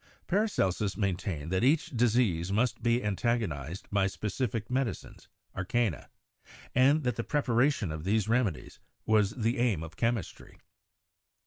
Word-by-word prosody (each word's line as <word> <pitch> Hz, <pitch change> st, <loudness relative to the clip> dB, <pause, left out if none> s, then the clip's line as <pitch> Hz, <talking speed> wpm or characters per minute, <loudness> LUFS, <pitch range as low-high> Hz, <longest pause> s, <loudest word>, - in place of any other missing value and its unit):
Paracelsus 105 Hz, -, 0 dB
maintained 90 Hz, -6 st, -2 dB
that 95 Hz, +3 st, +1 dB
each 145 Hz, +5 st, +2 dB
dis 120 Hz, -2 st, +2 dB
ease 90 Hz, -7 st, +1 dB
must 115 Hz, +3 st, +1 dB
be 120 Hz, +1 st, +1 dB
antagonized 95 Hz, -, -2 dB
by 100 Hz, -1 st, +2 dB
specific 110 Hz, +2 st, -3 dB
medicines 130 Hz, -1 st, -3 dB
( -, -, -41 dB
"arcana"), 95 Hz, -1 st, -1 dB, 0.6 s
and 140 Hz, +5 st, +4 dB
that 125 Hz, -3 st, -1 dB
the 115 Hz, -, -1 dB
preparation 125 Hz, -, +1 dB
of 75 Hz, 0 st, -5 dB
these 105 Hz, +3 st, +1 dB
remedies 115 Hz, -8 st, -1 dB, 0.3 s
was 105 Hz, -2 st, +3 dB
the 115 Hz, +2 st, -1 dB
aim 110 Hz, -10 st, +1 dB
of 80 Hz, -1 st, -9 dB
chemistry. 115 Hz, -6 st, -3 dB
110 Hz, 135 wpm, -30 LUFS, 95-125 Hz, 0.6 s, and